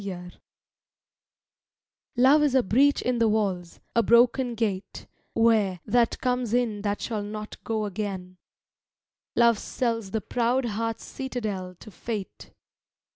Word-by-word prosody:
LOVE 180 -2 -7 1.8
Love 270 +5 +6
is 290 -3 +2
a 260 - +4
breach 275 +8 +3
in 250 -1 0
the 230 - +4
walls, 195 -5 -1 0.2
a 230 - +5
broken 240 +1 +3
gate, 205 -4 -3 0.3
Where 220 -5 +3
that 240 -1 +2
comes 250 -2 0
in 225 -4 0
that 205 0 -1
shall 220 -3 -2
not 210 +1 -7
go 220 -2 -1
again; 190 -3 -5 1.0
Love 235 -3 +4
sells 230 -5 -2
the 220 - -1
proud 245 +5 0
heart's 225 0 -3
citadel 215 -9 -5
to 215 - -11
Fate. 210 -1 -6
225 Hz, 130 wpm, -26 LUFS, 205-240 Hz, 1.8 s, Love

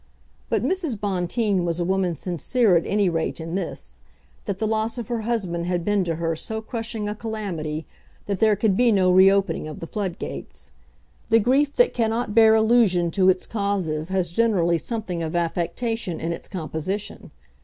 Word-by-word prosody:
But - - +1
Mrs. 335 - -1
Bonteen 195 0 0
was 170 0 -1
a 175 - 0
woman 185 -2 0
sincere 185 - +1
at 170 - +1
any 205 -1 +2
rate 165 -1 -1
in 165 +1 -6
this, 195 - -5 0.4
that 200 -3 -3
the 220 - -1
loss 220 +2 -1
of 235 -3 -6
her 235 -2 -1
husband 190 -7 -2
had 175 -1 -1
been 205 -2 +2
to 165 -1 -1
her 165 0 -1
so 220 +7 -4
crushing 225 -1 -4
a 210 - -2
calamity 190 -9 -4 0.4
that 200 -2 -2
there 215 -1 +4
could 205 -1 +1
be 240 +2 +4
no 185 -3 +4
reopening 190 -3 +4
of 155 - -8
the - - -6
floodgates. 190 -1 -6 0.6
The 225 - +6
grief 275 +6 +2
that - - +4
cannot 225 -1 -1
bear 220 -1 +6
allusion 220 -6 +3
to 185 +1 +3
its 185 0 +1
causes 185 -7 -2
has 185 -3 -1
generally 175 -5 +2
something 190 -2 -4
of 160 +1 -3
affectation 175 +4 -2
in 165 - -2
its - - -8
composition. 185 +3 -5
195 Hz, 175 wpm, -23 LUFS, 170-220 Hz, 0.6 s, The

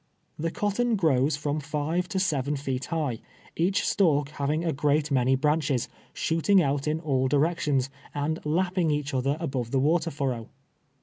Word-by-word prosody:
The 165 +2 0
cotton 215 +6 0
grows 150 -6 +2
from 145 +1 -2
five 155 +4 -2
to 200 - -3
seven 150 -6 0
feet 135 -2 -3
high, 150 -9 -2 0.4
each 185 +4 +1
stalk 150 -7 +2
having 150 +2 -1
a 165 - +1
great 145 +2 +1
many 130 0 +3
branches, 145 -2 +1 0.2
shooting 165 +5 +2
out 140 -3 0
in 155 +1 0
all 135 -4 0
directions, 145 -2 +1 0.2
and 150 +3 -2
hipping 175 +2 +1
each 145 -1 -2
other 135 +3 0
above 135 -8 -3
the 135 - +1
wa 155 +6 +3
ter 165 +1 -4
furrow. 130 -6 -3
150 Hz, 165 wpm, -27 LUFS, 135-165 Hz, 0.4 s, many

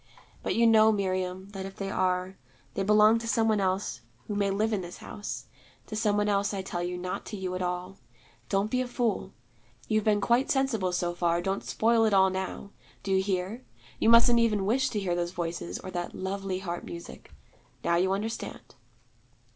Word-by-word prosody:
But - - -1
you 235 - +4
know, 220 -1 +6
Miriam, 185 -1 -2
that 195 -1 -6
if 195 - -11
they 195 -1 -4
are, 185 0 0 0.4
they - - -2
belong 210 +3 +5
to 230 - -6
some 225 -1 +2
one 215 -2 +3
else 185 -9 -1 0.2
who - - -4
may 200 -1 +1
live 215 +3 0
in 200 - 0
this 175 0 -8
house: 205 - -6 0.4
to 215 - -6
some 210 -1 +1
one 205 0 +2
else, 200 0 +1
I 190 - -3
tell 175 -2 -4
you, 180 +1 -3
not 180 +1 -4
to 210 - -5
you 185 -1 -3
at 185 - -3
all. 180 +2 -3 0.5
Don't 200 +2 +1
be 255 - +2
a 255 - -2
fool. 235 -6 -1 0.6
You've 215 -1 +1
been 210 -1 +3
quite 235 +6 +2
sensible 245 -9 +1
so 175 -1 -1
far: 170 -1 +1
don't 195 +3 -2
spoil 225 0 +2
it 215 -2 +3
all 190 0 +5
now. 190 +1 -4 0.3
Do 195 - -3
you 190 0 +4
hear? 190 +5 -2 0.4
you - - +3
mustn't 235 +1 +7
even 210 -4 +2
wish 260 +5 +2
to 215 - -2
hear 185 -3 -1
those 175 0 -2
Voices, 165 - -3
or 185 - -8
that 175 -1 -4
lovely 190 0 -3
harp 175 -2 -4
music. 170 0 -9 0.5
Now 170 - +2
you 185 +2 +2
understand.' 215 +4 -4
195 Hz, 200 wpm, -28 LUFS, 185-215 Hz, 0.6 s, mustn't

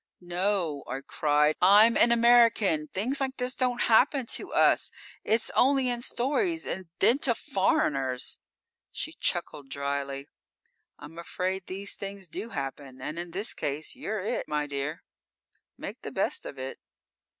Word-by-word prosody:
"_ - - -62 0.2
"No!" 175 -5 0
I 135 - -4
cried. 150 +1 +2
"I'm 210 +5 +7
an 235 - +5
American! 230 -9 +4
Things 250 - -2
like 265 0 -2
this 250 0 -1
don't 250 -1 0
happen 255 +3 +4
to - - -2
us! - - +3 0.3
It's 225 +1 +1
only 270 0 +3
in 240 -1 -2
stories, 295 - 0
and 185 -2 -4
then 240 +7 +4
to 245 -5 +1
foreigners!" 135 - 0 0.5
_She - - -5
chuckled 140 -2 -1
drily. 140 0 -3 0.7
"I'm 155 +3 -11
afraid 185 +2 -3
these 195 +1 -2
things 195 -1 -7
do 210 +7 -6
happen, 135 - -6
and 155 +6 -5
in 175 0 -5
this 195 +6 -2
case, 145 +2 -3
you're 215 -1 -4
it, 225 +6 -2
my 150 0 -1
dear. 145 +2 -4 0.7
Make - - -7
the - - -6
best - - -1
of - - -9
it." 130 +1 -6
190 Hz, 150 wpm, -28 LUFS, 150-235 Hz, 0.7 s, I'm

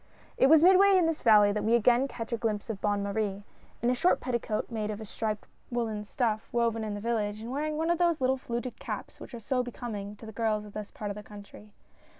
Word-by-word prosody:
It 265 - +4
was 315 +2 +7
midway 380 +2 +7
in 355 - +4
this 325 -1 -1
valley 210 -3 +6
that 210 +1 -2
we 225 +2 +3
again 245 +3 +4
catch 230 -3 -6
a - - +1
glimpse 220 -1 -2
of 195 - -7
Bonne 205 -1 0
Marie 200 -1 -2 0.2
— - - -29
in 240 - +3
a - - +3
short 350 +9 +2
petticoat, 235 -3 -2
made 215 -2 -2
of 210 0 -4
a 220 - -7
striped 215 0 -3 0.2
woolen 225 -4 -2
stuff 220 0 -1
woven 230 -2 0
in 210 -1 -3
the - - -5
village, 215 -2 -1
and 230 +2 -7
wear 290 +3 -1
ing 305 0 -2
one 325 +2 +1
of 345 - 0
those 340 -2 +2
little 260 0 +2
fluted 240 0 -5
caps - - -6
which - - -9
are - - -7
so 250 +3 0
becoming 220 -4 -6
to 225 - -12
the 220 - -8
girls 215 -1 -1
of 205 - -12
this 210 -1 -6
part 205 -1 -5
of - - -6
the 210 - -7
country. 210 0 -13
225 Hz, 255 wpm, -29 LUFS, 210-250 Hz, 0.2 s, was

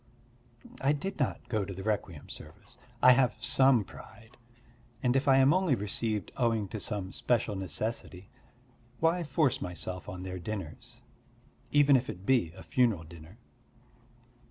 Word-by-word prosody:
I 140 +2 +3
did 190 +7 -4
not 135 - -2
go 110 -4 0
to 95 0 -6
the 95 - -7
requiem 100 -7 -3
service. - - -12 0.3
I 125 - +10
have 125 -1 +3
some 125 -2 +4
pride, 110 +3 -14 0.7
and 125 0 +2
if 135 +1 +1
I 135 -1 +6
am 135 +2 +5
only 185 -6 +2
received 105 0 -2
owing 115 -4 +1
to 110 - -5
some 100 -3 -4
special 115 -4 0
necessity, 95 -1 -4 0.7
why 170 +2 +2
force 145 -2 +1
myself 90 +1 -5
on 90 0 -7
their 95 0 -5
dinners, 95 -3 -7 0.7
even 145 -1 +5
if 125 0 +1
it 95 -3 -7
be 120 -11 +2
a - - -11
funeral 115 -9 +1
dinner. 80 +4 -13
110 Hz, 150 wpm, -30 LUFS, 95-135 Hz, 0.7 s, I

